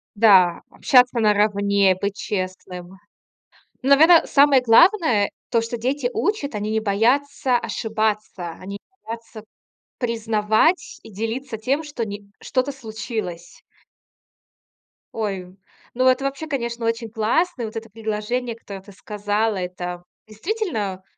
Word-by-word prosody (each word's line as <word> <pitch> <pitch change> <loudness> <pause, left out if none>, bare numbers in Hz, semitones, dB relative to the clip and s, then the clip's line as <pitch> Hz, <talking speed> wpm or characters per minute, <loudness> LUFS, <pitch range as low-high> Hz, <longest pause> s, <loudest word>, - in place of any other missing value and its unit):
Да, 190 -5 +5
общаться 250 -2 +3
наравне, 200 -2 +3
быть 200 +1 -2
честным. 185 -2 -5 0.9
Ну 260 - -2
наверно, 320 +4 +7
самое 275 -2 +5
главное- 250 - +4 0.2
то, 230 - +3
что 230 +1 -4
дети 255 +3 -1
учат, 335 -7 -1
они 210 +1 -3
не 220 0 +1
боятся 250 +5 +1
ошибаться, 215 -6 -2
они 200 +2 -7
не 380 - -21
боятся 225 -1 -8 0.5
признавать 225 - +1
и - - -13
делиться 225 +4 -4
тем, 270 +8 -1
что 290 -6 -4
ни 205 -1 -8
что-то 260 +2 -1
случилось. 220 -8 -7 1.5
Ой! 195 -4 -4 0.4
Ну, 255 +1 +2
это 255 +1 +3
вообще, 275 +3 -3
конечно, 235 -5 -3
очень 230 0 -2
классно. 235 +6 0
Вот 220 - -8
это 225 0 -6
предложение, 225 +3 -3
которое 200 -4 -10
ты 200 - -15
сказала. 210 +2 -2
Это 180 -1 -5 0.2
действительно 215 - -3
225 Hz, 120 wpm, -22 LUFS, 205-255 Hz, 1.5 s, наверно